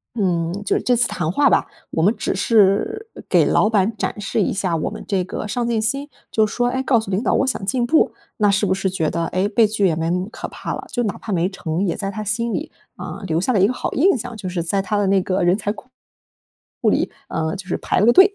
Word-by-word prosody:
嗯 175 -6 0
就 - - +1
是 - - -2
这 250 - +2
次 245 +1 +3
谈 165 -2 -2
话 285 +6 +4
吧， - - +3 0.2
我 160 - 0
们 200 +7 +4
只 - - -1
是 220 - +2 0.2
给 - - +4
老 210 - +3
板 215 0 +1
展 - - -3
示 205 +2 -1
一 - - +1
下 185 -4 -1
我 155 - -1
们 - - -8
这 190 -3 +1
个 185 - -5
上 235 +3 -1
进 230 -2 +1
心， 275 +7 -1 0.2
就 220 -1 +3
说 245 +3 0
诶， 260 +1 -1
告 255 -4 +3
诉 200 -3 -6
领 190 - +1
导 - - +1
我 - - +2
想 260 - -1
进 240 +4 +1
步。 315 +6 +3 0.2
那 205 -2 +3
是 200 +1 +2
不 190 - +2
是 190 0 -1
觉 165 -4 -1
得， 170 0 -1
诶， 185 +4 0
被 220 0 +4
拒 210 -2 0
也 165 - +2
没 165 +1 -1
那 180 - +1
么 180 - -2
可 - - -6
怕 - - -5
了。 - - -7
就 245 - 0
哪 210 - -2
怕 215 - -6
没 175 0 +2
成 180 -1 -2
也 175 - -1
在 195 - -3
他 215 +1 -5
心 230 +3 -1
里， 310 - -4 0.3
呃 - - -7
留 160 -1 +1
下 250 +7 +1
了 205 - +3
一 195 - +6
个 255 - -1
好 - - -3
印 325 0 +3
象， 235 +1 -6
就 190 - -6
是 175 -2 -2
在 195 +4 0
他 200 +2 -1
的 205 - +2
那 195 0 +3
个 185 0 0
人 175 +2 +4
才 205 -1 -2
库 250 - -14 0.9
库 - - +3
里， - - +1 0.2
呃 160 0 -2
就 185 -1 -9
是 - - -1
排 - - 0
了 210 - +4
个 240 - +6
队。 385 +2 +7
205 Hz, 300 characters per minute, -21 LUFS, 185-235 Hz, 0.9 s, 队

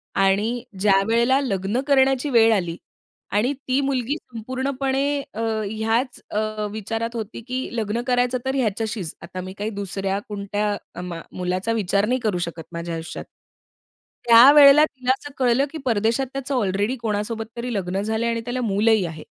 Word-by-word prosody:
आणि 205 +5 +1 0.2
ज्यावेळेला 225 +7 +3
लग्न 205 -1 -1
करण्याची 270 0 +3
वेळ 225 -3 +5
आली 175 -5 -1 0.6
आणि 225 +7 +2
ती 260 +1 +2
मुलगी 270 -1 -1
संपूर्णपणे 265 +3 -2 0.3
अ, 225 - -4 0.3
ह्याच 225 +4 -1
अ, 215 0 -2
विचारात 225 +2 -4
होती 225 0 -5
की 255 +1 -3
लग्न 220 +1 -1
करायचं 250 0 +2
तर 265 +1 -1
ह्याच्याशीच. 220 - -2
आता 185 - -7
मी 185 +1 -7
काही 210 +1 -2
दुसऱ्या 195 0 -2
कोणत्या 205 -2 -3
मा 175 -2 -6
मुलाचा 185 +4 -2
विचार 200 0 +1
नाही 250 +4 0
करू 210 -5 +1
शकत 165 -1 -7
माझ्या 170 0 -5
आयुष्यात. 165 +1 -6 1.0
त्यावेळेला 280 +5 +9
तिला 255 -4 -2
असं 290 - -10
कळलं 255 +1 +3
की 320 - -6
परदेशात 230 +2 +1
त्याचं 275 0 -3
ऑलरेडी 205 +1 0
कोणासोबत 225 0 -2
तरी 240 +1 -3
लग्न 190 -1 -2
झालं 220 +2 -1
आहे 235 - +1
आणि 230 - -2
त्याला 245 +1 -2
मूलही 215 -2 +2
आहे. 160 -2 -7
225 Hz, 155 wpm, -23 LUFS, 200-255 Hz, 1.0 s, त्यावेळेला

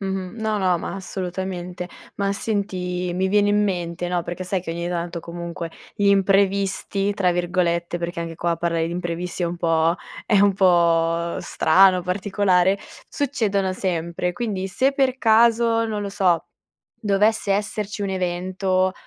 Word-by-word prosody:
Mh-mh. 190 -1 -4
No, 215 -1 0
no, 185 -2 +2
ma - - -5
assolutamente. 180 -1 -5 0.3
Ma 200 0 0
senti, 180 -4 -2
mi 190 +1 0
viene 205 +1 +3
in 210 0 +3
mente, 175 -3 -2
no, 175 -1 0
perché 175 +2 -5
sai 185 +1 -1
che 170 - -6
ogni 170 +1 -3
tanto 170 -1 -3
comunque 170 0 -6 0.2
gli 205 - 0
imprevisti, 195 0 +2
tra 190 -3 +2
virgolette 175 -1 0
-perché 170 0 -4
anche 165 -1 -5
qua 170 +1 -1
parlare 165 -1 0
di 170 - -4
imprevisti 175 +1 -4
è - - +2
un 170 +1 -4
po' 165 -1 +2 0.3
è 205 -3 +4
un 200 0 +5
po' 170 -2 +2
strano, 185 +2 +4
particolare 190 0 +2 0.3
succedono 210 -9 0
sempre. 180 -1 -2
Quindi, 205 -4 -3
se 260 +9 +1
per 270 -2 +1
caso, 230 0 +4
non 210 -2 -3
lo 200 - -3
so, 185 -4 +1 0.6
dovesse 205 0 +2
esserci 210 +1 -2
un 200 - -1
evento, 185 0 0
185 Hz, 155 wpm, -22 LUFS, 175-200 Hz, 0.6 s, un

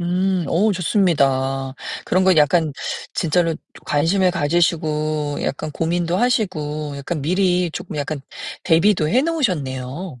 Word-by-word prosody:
음, 180 +1 0
오우 205 +6 +2
좋습니다. 135 -8 +1 0.3
그런 185 - +2
건 185 -2 +4
약간 155 +1 +3 0.4
진짜로 165 0 +1 0.3
관심을 180 +5 +2
가지시고 155 -3 0
약간 150 +2 -3
고민도 170 +2 0
하시고 155 - -1
약간 145 +3 -4
미리 180 +2 +1
쪼끔 155 - -6
약간 145 0 -3 0.4
대비도 165 -1 +3
해 250 +9 +3
놓으셨네요. 160 - -2
165 Hz, 275 characters per minute, -20 LUFS, 150-185 Hz, 0.4 s, 건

